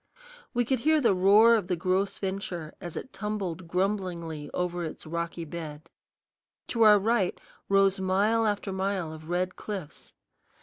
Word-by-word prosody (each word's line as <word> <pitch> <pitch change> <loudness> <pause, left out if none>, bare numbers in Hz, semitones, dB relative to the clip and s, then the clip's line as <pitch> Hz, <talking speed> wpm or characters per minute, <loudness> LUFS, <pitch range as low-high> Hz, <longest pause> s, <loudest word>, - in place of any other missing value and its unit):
We 245 0 +2
could 260 +1 +1
hear 310 +5 +3
the 235 -8 +3
roar 205 +5 +6
of 215 -6 +1
the 180 - 0
Gros 185 +3 0
Ventre 190 -5 -4
as 175 -3 -6
it 260 - -7
tumbled 190 -5 -4
grumblingly 180 -4 -2
over 175 -1 -2
its 160 - -7
rocky 170 +1 -4
bed. 155 -1 -8 0.8
To 230 - -1
our 210 -2 +8
right 205 -2 +1 0.3
rose 195 0 +4
mile 205 +4 +2
after 205 -1 -1
mile 190 -4 -2
of 160 +1 -11
red 180 +1 -1
cliffs. 185 -9 -7
190 Hz, 150 wpm, -28 LUFS, 170-210 Hz, 0.8 s, our